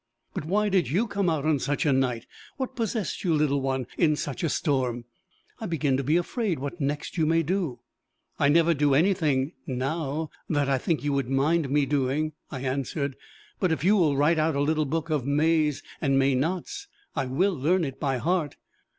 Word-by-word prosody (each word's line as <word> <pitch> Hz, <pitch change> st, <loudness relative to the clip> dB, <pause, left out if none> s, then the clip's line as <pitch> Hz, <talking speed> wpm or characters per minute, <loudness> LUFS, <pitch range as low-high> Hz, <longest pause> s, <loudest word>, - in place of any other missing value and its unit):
"But -, -, -4 dB
why 210 Hz, +5 st, +1 dB
did 185 Hz, -10 st, +2 dB
you 190 Hz, -, +2 dB
come 200 Hz, -4 st, 0 dB
out 155 Hz, -3 st, -1 dB
on 155 Hz, -3 st, +2 dB
such 145 Hz, +5 st, -1 dB
a 145 Hz, -, +4 dB
night? 125 Hz, -3 st, 0 dB, 0.3 s
What 260 Hz, -1 st, -4 dB
possessed 225 Hz, -3 st, -2 dB
you, 170 Hz, -4 st, +2 dB
little 145 Hz, -2 st, +1 dB
one 130 Hz, -1 st, -1 dB
in 155 Hz, -4 st, +4 dB
such 145 Hz, -1 st, -4 dB
a 165 Hz, -, +1 dB
storm? 130 Hz, -6 st, 0 dB, 0.5 s
I 220 Hz, -, -4 dB
begin 150 Hz, -5 st, +1 dB
to 135 Hz, -, -1 dB
be 150 Hz, +6 st, +3 dB
afraid 190 Hz, 0 st, -1 dB
what 145 Hz, +5 st, -5 dB
next 145 Hz, +4 st, -2 dB
you 155 Hz, -, +3 dB
may 165 Hz, +1 st, +3 dB
do." 160 Hz, -8 st, -2 dB, 0.6 s
"I 140 Hz, -, +4 dB
never 170 Hz, +2 st, +4 dB
do 145 Hz, -2 st, +2 dB
anything 155 Hz, -5 st, +2 dB, 0.2 s
now 145 Hz, +3 st, -2 dB, 0.2 s
that 145 Hz, -3 st, +1 dB
I 135 Hz, -1 st, +2 dB
think 160 Hz, +3 st, -1 dB
you 145 Hz, -1 st, 0 dB
would 135 Hz, -3 st, -1 dB
mind 140 Hz, +3 st, +2 dB
me 145 Hz, +1 st, +2 dB
doing," 145 Hz, +2 st, 0 dB, 0.2 s
I 130 Hz, -, -6 dB
answered. 135 Hz, +1 st, -2 dB, 0.4 s
"But 185 Hz, -4 st, +1 dB
if 155 Hz, -3 st, -1 dB
you 200 Hz, +4 st, +5 dB
will 155 Hz, -8 st, +3 dB
write 155 Hz, +3 st, +3 dB
out 155 Hz, -1 st, +1 dB
a 140 Hz, -, +1 dB
little 155 Hz, +1 st, +1 dB
book 160 Hz, +3 st, -2 dB
of 150 Hz, -4 st, +1 dB
mays 150 Hz, 0 st, +2 dB, 0.2 s
and 135 Hz, -3 st, +2 dB
maynots, 150 Hz, -, 0 dB, 0.3 s
I 130 Hz, -, -1 dB
will 185 Hz, +10 st, +1 dB
learn 170 Hz, +5 st, +1 dB
it 135 Hz, -4 st, -5 dB
by 135 Hz, -3 st, 0 dB
heart." 165 Hz, +2 st, 0 dB
150 Hz, 200 wpm, -26 LUFS, 135-170 Hz, 0.6 s, you